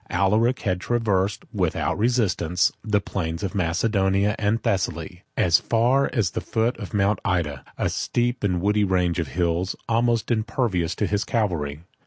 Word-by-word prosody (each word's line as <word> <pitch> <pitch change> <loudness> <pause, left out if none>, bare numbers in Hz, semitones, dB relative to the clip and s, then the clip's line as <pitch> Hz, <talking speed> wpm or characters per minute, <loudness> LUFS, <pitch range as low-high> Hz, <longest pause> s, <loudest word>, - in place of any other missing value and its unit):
Alaric 105 +7 +2
had 90 -3 -1
traversed, 105 -5 0
without - - 0
resistance, 100 -6 +1
the 105 -1 +2
plains 85 -3 -4
of 100 - -2
Macedonia 100 +2 +1
and 105 +2 +1
Thessaly, 90 -2 -2 0.2
as 85 -2 +4
far 125 +4 +2
as 105 -9 0
the - - -3
foot 115 +2 0
of 100 - -7
Mount 105 +1 +1
Oeta, 85 -8 -1 0.2
a - - 0
steep 120 0 -1
and 90 -4 +1
woody 105 +2 +2
range 90 -2 +1
of 80 - -1
hills, 85 +5 -1
almost 115 0 +1
impervious 110 -7 0
to 105 - 0
his 105 +1 0
cavalry. 80 -10 -1
100 Hz, 155 wpm, -24 LUFS, 90-110 Hz, 0.2 s, as